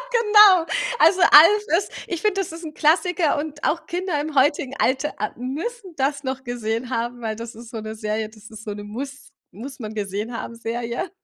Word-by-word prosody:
Genau. 420 Hz, -6 st, +6 dB, 0.3 s
Also, 375 Hz, -2 st, +5 dB
„Alf“ 415 Hz, +8 st, +7 dB
ist 400 Hz, -, -4 dB, 0.2 s
ich 345 Hz, -3 st, -4 dB
finde, 405 Hz, 0 st, +1 dB
das 335 Hz, -, -8 dB
ist 335 Hz, +1 st, -9 dB
'n 305 Hz, -, -9 dB
Klassiker 335 Hz, 0 st, +2 dB
und 295 Hz, 0 st, -6 dB
auch 335 Hz, +2 st, -1 dB
Kinder 355 Hz, -3 st, -2 dB
im 305 Hz, +1 st, -5 dB
heutigen 275 Hz, -1 st, +2 dB
Alter 265 Hz, +3 st, 0 dB
a 210 Hz, -, -2 dB
müssen 340 Hz, -, -5 dB
das 275 Hz, +1 st, -1 dB
noch 265 Hz, -1 st, -4 dB
gesehen 240 Hz, 0 st, -3 dB
haben, 240 Hz, 0 st, -3 dB
weil 220 Hz, -1 st, -2 dB
das 230 Hz, +1 st, -8 dB
ist 230 Hz, +1 st, -12 dB
so 230 Hz, -3 st, -6 dB
'ne 215 Hz, 0 st, -6 dB
Serie, 215 Hz, 0 st, -3 dB
das 215 Hz, 0 st, -15 dB
ist 220 Hz, 0 st, -11 dB
so 210 Hz, -, -4 dB
'ne 205 Hz, 0 st, -8 dB
muss 275 Hz, +6 st, -8 dB, 0.2 s
muss 250 Hz, +9 st, -9 dB
man 220 Hz, -3 st, -7 dB
gesehen 210 Hz, +3 st, -4 dB
haben -, -, -6 dB
Serie. 235 Hz, +7 st, -4 dB
265 Hz, 205 wpm, -22 LUFS, 225-330 Hz, 0.3 s, Alf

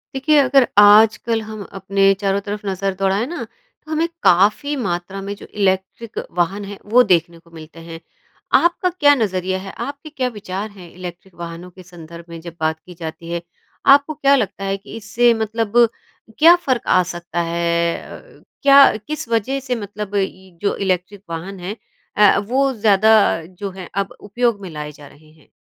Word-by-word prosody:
देखिए 300 Hz, +3 st, +2 dB
अगर 270 Hz, -2 st, +4 dB
आजकल 220 Hz, +2 st, +5 dB
हम 215 Hz, -1 st, -8 dB
अपने 195 Hz, +1 st, +2 dB
चारों 195 Hz, 0 st, +1 dB
तरफ 205 Hz, 0 st, -4 dB
नज़र 195 Hz, 0 st, -2 dB
दौड़ाए 195 Hz, +4 st, +1 dB
ना 345 Hz, +5 st, -5 dB
तो -, -, -19 dB
हमें 320 Hz, +2 st, +1 dB, 0.2 s
काफ़ी 210 Hz, -, +3 dB
मात्रा 190 Hz, -5 st, -4 dB
में 200 Hz, +1 st, -5 dB
जो -, -, -13 dB
इलेक्ट्रिक 195 Hz, +3 st, -2 dB, 0.2 s
वाहन 195 Hz, +4 st, 0 dB
हैं 200 Hz, 0 st, -8 dB, 0.2 s
वो 250 Hz, +1 st, +7 dB
देखने 170 Hz, -1 st, +1 dB
को 170 Hz, 0 st, -24 dB
मिलते 160 Hz, 0 st, -12 dB
हैं। 165 Hz, 0 st, -9 dB, 0.6 s
आपका 345 Hz, +1 st, +1 dB
क्या 295 Hz, -5 st, +4 dB
नज़रिया 190 Hz, -5 st, -1 dB
है, 195 Hz, 0 st, -8 dB
आपके 280 Hz, +2 st, -6 dB
क्या 265 Hz, -4 st, -2 dB
विचार 210 Hz, -2 st, -6 dB
हैं 185 Hz, -4 st, -13 dB
इलेक्ट्रिक 180 Hz, 0 st, -10 dB
वाहनों 170 Hz, +1 st, -7 dB
के 185 Hz, +1 st, -14 dB
संदर्भ 170 Hz, -1 st, -12 dB
में 165 Hz, 0 st, -8 dB
जब 170 Hz, 0 st, -10 dB
बात 160 Hz, 0 st, -1 dB
की 180 Hz, -, -14 dB
जाती 165 Hz, 0 st, -7 dB
है? 170 Hz, 0 st, -2 dB, 0.4 s
आपको 280 Hz, +2 st, +5 dB
क्या 280 Hz, -1 st, +3 dB
लगता 200 Hz, -6 st, -2 dB
है 195 Hz, 0 st, -1 dB
कि 195 Hz, -, -12 dB
इससे 230 Hz, +3 st, +2 dB
मतलब 225 Hz, 0 st, -2 dB, 0.6 s
क्या 330 Hz, +3 st, +8 dB
फ़र्क 255 Hz, -3 st, 0 dB
आ 185 Hz, -, +4 dB
सकता 175 Hz, 0 st, -4 dB
है 170 Hz, 0 st, 0 dB
अ, -, -, -13 dB, 0.2 s
क्या 275 Hz, -4 st, +7 dB
किस 270 Hz, +4 st, -6 dB
वज़ह 230 Hz, +4 st, 0 dB
से 250 Hz, -, 0 dB
मतलब 205 Hz, -1 st, -6 dB, 0.5 s
जो 200 Hz, -, 0 dB
इलेक्ट्रिक 190 Hz, +1 st, -2 dB
वाहन 180 Hz, +4 st, -6 dB
है 185 Hz, +4 st, -5 dB, 0.4 s
अ, 210 Hz, -1 st, +6 dB
वो 260 Hz, +7 st, 0 dB
ज़्यादा 215 Hz, -1 st, +4 dB, 0.3 s
जो 190 Hz, +3 st, -7 dB
है 180 Hz, -, -8 dB
अब 200 Hz, -1 st, -2 dB
उपयोग 220 Hz, 0 st, -1 dB
में 190 Hz, -, -7 dB
लाए 150 Hz, -2 st, -6 dB
जा 145 Hz, 0 st, -14 dB
रहे 155 Hz, +2 st, -20 dB
हैं? 155 Hz, -2 st, -24 dB
200 Hz, 180 wpm, -19 LUFS, 175-230 Hz, 0.6 s, क्या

